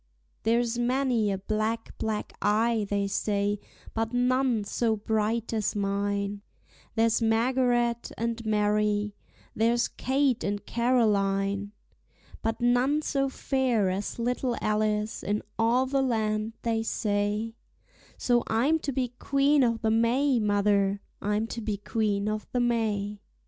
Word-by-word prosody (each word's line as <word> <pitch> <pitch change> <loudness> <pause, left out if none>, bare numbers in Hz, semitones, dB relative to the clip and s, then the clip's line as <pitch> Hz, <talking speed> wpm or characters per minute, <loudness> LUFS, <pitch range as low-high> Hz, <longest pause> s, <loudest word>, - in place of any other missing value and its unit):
There's 235 +1 +1
many 245 -3 +1
a 195 - -1
black, 215 +3 -2
black 215 -1 -2
eye, 220 0 +2
they 200 -1 0
say, 205 0 0 0.3
but 225 +1 -2
none 250 -2 +2
so 220 +2 0
bright 220 +2 -1
as 215 -2 0
mine; 200 0 -1 0.5
There's 225 0 +2
Margaret 240 +1 +1
and 230 0 -2
Mary, 210 -1 +1 0.4
there's 235 +2 +2
Kate 265 -1 0
and 205 0 -2
Caroline; 205 -4 +1 0.7
But 225 0 -2
none 250 +5 +2
so 275 -2 0
fair 255 -8 +1
as 195 +2 -3
little 245 +1 -1
Alice 215 0 0
in 205 +1 -1 0.2
all 235 +3 +3
the 270 +1 +1
land, 220 -3 0
they 225 -1 0
say: 210 0 -1 0.6
So 240 -1 +2
I'm 270 +9 +2
to 285 - -3
be 255 -1 -1
Queen 280 0 +3
o' 230 -2 +2
the 225 -1 0
May, 240 +4 +3
mother, 205 -1 +2 0.2
I'm 210 +2 0
to 230 +1 -6
be 210 -2 -2
Queen 205 -1 -1
o' 215 0 -1
the 250 - +1
May. 210 -4 0
225 Hz, 130 wpm, -27 LUFS, 210-240 Hz, 0.7 s, all